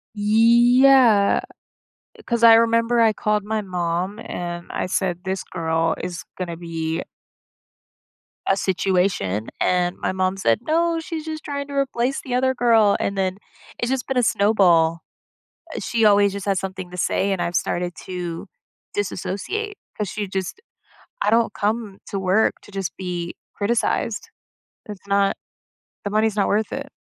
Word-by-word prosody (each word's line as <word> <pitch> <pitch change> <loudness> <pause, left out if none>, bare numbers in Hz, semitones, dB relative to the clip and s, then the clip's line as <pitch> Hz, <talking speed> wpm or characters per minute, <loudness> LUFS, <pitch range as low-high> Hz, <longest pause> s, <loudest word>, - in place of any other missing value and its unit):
Yeah, 235 +1 +5 0.9
'cause 235 -1 0
I 225 -1 +10
remember 230 +1 +3
I 220 -2 +5
called 210 -1 0
my 215 0 -1
mom, 180 +2 -2
and 175 -4 -6
I - - -2
said, 180 -2 -1
"This 190 0 -3
girl 165 -1 -1
is 180 -1 -5
gonna 170 -2 -4
be" 165 -1 -3 1.5
"a 195 - +4
situation." 180 - 0
And 180 0 +1
my - - -2
mom 185 0 -1
said, 195 - +2
"No, 330 +1 +2
she's 325 -2 -6
just 315 0 -5
trying 280 -1 -4
to 285 - -8
replace 270 -1 0
the 250 -2 -3
other 260 +1 +2
girl." 225 -4 +4
And 200 0 -2
then 190 0 0 0.4
it's 240 - -1
just 265 -2 -2
been 265 -1 -1
a 245 - +3
snowball. 175 -7 +3 0.8
Eh, - - -3
she 225 -2 +1
always 205 -1 +5
just 200 -1 -5
has 195 -2 +1
something 185 -2 -6
to 180 - -8
say, 195 +2 0
and 185 -2 -1
I've 170 0 -2
started 175 0 -1
to 180 0 -5 0.5
disassociate 290 - -3 0.2
'cause 210 -3 -2
she 210 -2 -4
just 190 - -4 0.6
I - - +2
don't 230 0 +3
come 210 -1 -2
to 195 - -3
work 190 +3 +2
to 205 - -15
just 195 -4 -4
be 175 -2 -4 0.2
criticized. 225 +3 -1 0.6
It's 205 -2 -10
not 200 0 +2 0.7
the - - -1
money's 215 0 +2
not 200 - +2
worth 215 +1 0
it. 275 +1 -5
200 Hz, 155 wpm, -22 LUFS, 180-230 Hz, 1.5 s, I